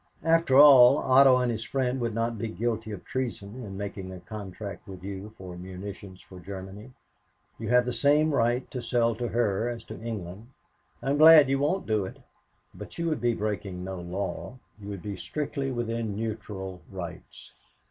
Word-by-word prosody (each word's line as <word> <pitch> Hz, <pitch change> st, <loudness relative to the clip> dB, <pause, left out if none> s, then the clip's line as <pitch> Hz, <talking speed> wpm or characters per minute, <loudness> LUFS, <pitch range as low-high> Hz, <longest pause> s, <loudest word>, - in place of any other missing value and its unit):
After 165 Hz, -5 st, +3 dB
all, 140 Hz, -2 st, +9 dB
Otto 130 Hz, -1 st, +6 dB
and 125 Hz, -1 st, +1 dB
his 115 Hz, -1 st, -3 dB
friend 130 Hz, 0 st, -1 dB
would 115 Hz, -2 st, -2 dB
not 115 Hz, 0 st, -1 dB
be 115 Hz, -, -2 dB
guilty 110 Hz, 0 st, -3 dB
of 100 Hz, -, -8 dB
treason 125 Hz, -2 st, -4 dB
in 95 Hz, -3 st, -7 dB
making 100 Hz, -2 st, -6 dB
a 95 Hz, -, -8 dB
contract 100 Hz, 0 st, -8 dB
with 95 Hz, -2 st, -10 dB
you 100 Hz, +2 st, -7 dB
for 90 Hz, -2 st, -9 dB
munitions 95 Hz, +1 st, -9 dB
for 95 Hz, -, -13 dB
Germany. 95 Hz, +5 st, -9 dB, 0.7 s
You -, -, -4 dB
have 125 Hz, 0 st, +4 dB
the 125 Hz, -, -2 dB
same 150 Hz, +3 st, +3 dB
right 120 Hz, 0 st, +1 dB
to 125 Hz, -, -4 dB
sell 115 Hz, 0 st, +1 dB
to 120 Hz, +2 st, -3 dB
her 115 Hz, -1 st, 0 dB
as 115 Hz, -2 st, -6 dB
to -, -, -10 dB
England. 105 Hz, -2 st, -6 dB, 0.6 s
I'm 140 Hz, +2 st, 0 dB
glad 155 Hz, -3 st, +9 dB
you 135 Hz, 0 st, +1 dB
won't 165 Hz, +7 st, 0 dB
do 110 Hz, -2 st, +1 dB
it -, -, -9 dB, 0.6 s
but -, -, -10 dB
you 170 Hz, -, -2 dB
would 155 Hz, -, -2 dB
be 120 Hz, -1 st, +1 dB
breaking 100 Hz, -4 st, -3 dB
no 95 Hz, 0 st, -5 dB
law 95 Hz, +7 st, -5 dB, 0.2 s
you 100 Hz, -, -10 dB
would 100 Hz, -3 st, -7 dB
be 105 Hz, -1 st, -4 dB
strictly 140 Hz, -, -3 dB
within 115 Hz, -3 st, -3 dB
neutral 105 Hz, -4 st, -5 dB
rights." -, -, -9 dB
115 Hz, 180 wpm, -27 LUFS, 100-125 Hz, 0.7 s, all